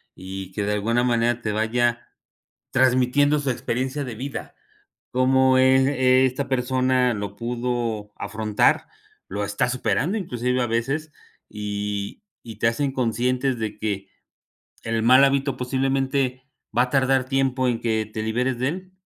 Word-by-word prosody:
y 95 0 -7
que 105 +2 -3
de 105 +1 0
alguna 115 +4 +1
manera 120 -1 +1
te 110 - -2
vaya 120 +2 0 0.6
transmitiendo 130 +3 +3
su 140 -2 -2
experiencia 130 +3 -2
de 125 -4 -6
vida. 135 +5 -6 0.6
Cómo 130 +1 +4
el 130 0 +5
es 130 -1 +3
esta 135 +2 -4
persona 130 -1 +1
lo 100 -1 -5
pudo 120 -2 -3
afrontar, 110 -1 +1 0.4
lo 100 +2 -3
está 105 +4 0
superando. 135 - 0
Inclusive 125 - -1
a 120 - 0
veces, 135 +7 -2 0.4
y 105 - -4 0.2
y 110 -2 -10
te 115 - +3
hacen 135 +4 0
conscientes 125 +1 0
de 110 -1 -4
que 100 -3 -3 0.7
el 115 0 -1
mal 130 +3 +7
hábito, 140 -1 +1
posiblemente 130 0 0 0.3
va 120 - +5
a 125 - -2
tardar 135 -1 +2
tiempo 130 -1 +1
en 120 -2 -1
que 110 -2 -1
te 110 - -3
liberes 125 +3 -1
de 130 - 0
él. 185 +4 -6
125 Hz, 150 wpm, -23 LUFS, 110-130 Hz, 0.7 s, mal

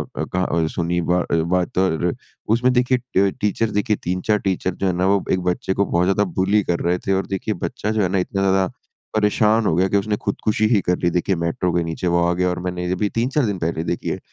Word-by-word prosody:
अ, - - -2
कहा 90 0 -2
अ, 85 -2 0
सुनी 85 +1 -1
बा 90 - +3
अ, - - +3 0.2
बात 90 0 -1
और 90 -2 +1 0.4
उसमें 125 +2 +2
देखिए 125 +1 +2 0.2
ट 95 0 +3
टीचर्स 105 +2 0
देखिए, 105 +1 +1
3-4 90 +4 0
टीचर 95 0 -1
जो 95 - -1
है 90 - +1
ना, 90 +1 0
वो 100 -1 +2
एक 95 - +1
बच्चे 90 +1 -2
को 100 +1 +1
बहुत 85 -1 +1
ज़्यादा 95 +2 +2 0.2
बुली 100 +2 +3
कर 85 -1 -1
रहे 90 +1 +1
थे 95 - +3
और 95 0 0
देखिए, 95 +2 -2
बच्चा 105 - -3
जो 110 -1 0
है 95 - +2
ना 95 - 0
इतना 95 +1 -1
ज़्यादा 95 -1 +2 0.4
परेशान 110 +1 +3
हो - - +2
गया 95 +3 +3
कि 100 - +1
उसने 105 +1 0
खुदकुशी 110 +2 -1
ही 110 -2 +3
कर 90 0 +1
ली। 85 - +2
देखिए, 90 +2 +1
मेट्रो 85 +1 -1
के 85 - +1
नीचे 80 +2 -3
वो 85 0 +2
आ 85 - +2
गया 90 +1 +1
और 90 - -2
मैंने 90 0 -3
ये 90 - -2
अभी 105 +3 0
3-4 130 +4 +1
दिन 100 -3 -1
पहले 80 -1 -2
देखी 85 - -3
है। - - -3
95 Hz, 255 wpm, -21 LUFS, 90-105 Hz, 0.4 s, बा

